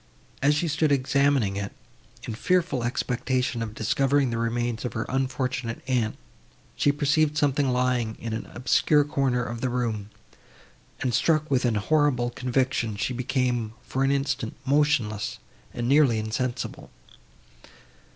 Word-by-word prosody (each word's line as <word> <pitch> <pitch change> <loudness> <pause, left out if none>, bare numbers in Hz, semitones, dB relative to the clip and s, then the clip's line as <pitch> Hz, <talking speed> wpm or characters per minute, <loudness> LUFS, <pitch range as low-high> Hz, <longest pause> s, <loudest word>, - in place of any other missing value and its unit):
As 145 +2 +4
she 165 +3 0
stood 155 0 +1
examining 140 -6 +2
it, 100 0 -4 0.5
in - - -5
fearful 170 0 +1
expectation 125 0 -1
of 110 -1 -5
discovering 135 0 +1
the 115 - -2
remains 115 0 -1
of 125 - -3
her 110 - -2
unfortunate 130 -2 -2
aunt, 120 -4 0 0.6
she 145 - +3
perceived 150 +1 +1
something 145 -2 +2
lying 125 -3 0
in 115 -1 -4
an 110 - -4
obscure 145 +4 +3
corner 135 -4 0
of 115 +1 -5
the 130 - 0
room, 115 -4 -2 0.9
and, 125 -2 0
struck 155 +4 +2
with 130 -1 +2
a 110 -3 +1
horrible 135 -2 +2
conviction, 125 -3 0
she 115 +5 -2
became, 125 -3 -1
for 130 +2 -1
an 135 - +3
instant, 135 -4 -1
motionless 135 -7 +1 0.3
and 120 0 -3
nearly 135 -4 +4
insensible. 110 +3 -3
125 Hz, 140 wpm, -26 LUFS, 115-140 Hz, 0.9 s, As